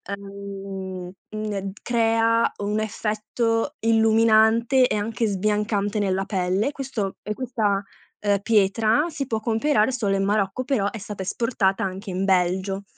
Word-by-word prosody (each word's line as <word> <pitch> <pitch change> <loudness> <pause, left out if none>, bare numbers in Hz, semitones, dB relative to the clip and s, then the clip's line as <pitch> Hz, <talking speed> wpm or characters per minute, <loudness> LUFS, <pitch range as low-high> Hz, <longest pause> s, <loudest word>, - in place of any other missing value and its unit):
uhm, 195 -2 -7 0.2
mhmm, 215 0 -4
e 195 0 -3
crea, 230 -1 +2
un 210 +1 0
effetto 225 +4 -1
illuminante 225 +2 +4
e - - -1
anche 220 +2 -1
sbiancante 205 +1 0
nella 195 -1 0
pelle; 195 +5 0
questo 255 -9 -4
e 210 - -3
questa, 215 -6 0 0.4
uhm, 200 -1 +3
pietra 220 +5 +3
si 275 -5 -4
può 225 -3 -1
comperare 225 +1 +2
solo 215 -6 0
in 195 - 0
Marocco, 200 +3 0
però 245 -7 0
è 225 - -7
stata 205 -1 -7
esportata 195 -1 0
anche 195 +2 -4
in 185 +1 -1
Belgio. 190 +1 +1
210 Hz, 140 wpm, -24 LUFS, 195-225 Hz, 0.4 s, illuminante